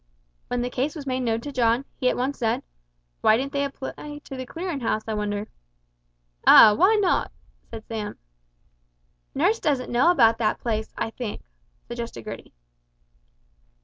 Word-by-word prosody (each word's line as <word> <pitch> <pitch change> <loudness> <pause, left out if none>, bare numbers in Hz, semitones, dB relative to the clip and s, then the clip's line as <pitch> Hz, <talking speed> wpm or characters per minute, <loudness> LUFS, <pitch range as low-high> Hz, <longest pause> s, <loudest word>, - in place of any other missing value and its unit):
When 245 0 -1
the 250 - -3
case 275 +6 -1
was 295 -3 -7
made 260 -1 -1
known 230 -2 0
to 290 - -6
John, 245 0 +1
he 255 -2 +1
at - - -1
once 265 +3 -2
said, 225 -3 0 0.6
"Why 215 - +5
didn't 275 +3 -3
they 280 0 0
apply 280 +2 -6
to 270 - -8
the 255 -1 -6
Clearin' 340 -1 -4
House, 220 -2 -1
I 220 - -2
wonder?" 210 0 -2 1.0
"Ah, 215 - +10
why 380 - +4
not?" 395 -4 +1 0.4
said 225 -1 -8
Sam. 215 -2 -5 1.2
"Nurse 385 +11 +2
doesn't 275 -4 -1
know 245 +8 +4
about 230 -9 +4
that 215 -2 0
place, 220 -2 -2
I 225 - -2
think," 230 -3 -6 0.4
suggested 235 - -6
Gertie. - - -8
245 Hz, 160 wpm, -24 LUFS, 225-280 Hz, 1.2 s, Ah